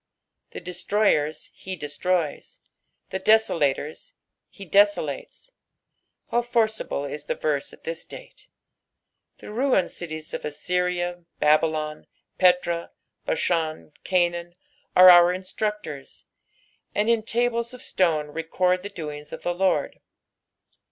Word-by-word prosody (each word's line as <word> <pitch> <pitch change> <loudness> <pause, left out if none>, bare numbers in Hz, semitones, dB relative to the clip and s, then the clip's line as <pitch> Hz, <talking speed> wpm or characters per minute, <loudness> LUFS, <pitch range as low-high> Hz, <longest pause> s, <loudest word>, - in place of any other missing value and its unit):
The - - -8
destrojers 180 -3 0
he 190 0 -7
destroys, 155 +1 -2 0.5
the 190 - -2
desolatora 190 - +1 0.4
he 200 - -11
'desolates. 200 - +1 0.8
How 240 - +3
forcible 220 - 0
is 145 +1 -6
the - - -2
Terse 145 -2 -1
at - - -17
this 165 +1 -5
date - - -12
I - - -39
The - - -9
ruined 240 -5 +1
cities 155 -2 -7
of - - -3
Ajtajna, 175 +2 -2
BabyloD, 155 0 +1 0.3
Petra, 180 -2 +3 0.4
Basbsn, 160 -2 -1
Canaan, 175 -1 0 0.4
are 185 0 +10
our 175 0 +7
instructors, 185 -5 -5 0.7
and 210 +1 +1
in 230 -1 +3
tables 235 +1 0
of 250 - -10
stone 155 -5 +1
record 180 +4 0
the 205 - -6
doings 150 -5 -7
of - - -8
the 175 - 0
Lord. 185 +1 0
175 Hz, 115 wpm, -25 LUFS, 155-205 Hz, 0.8 s, are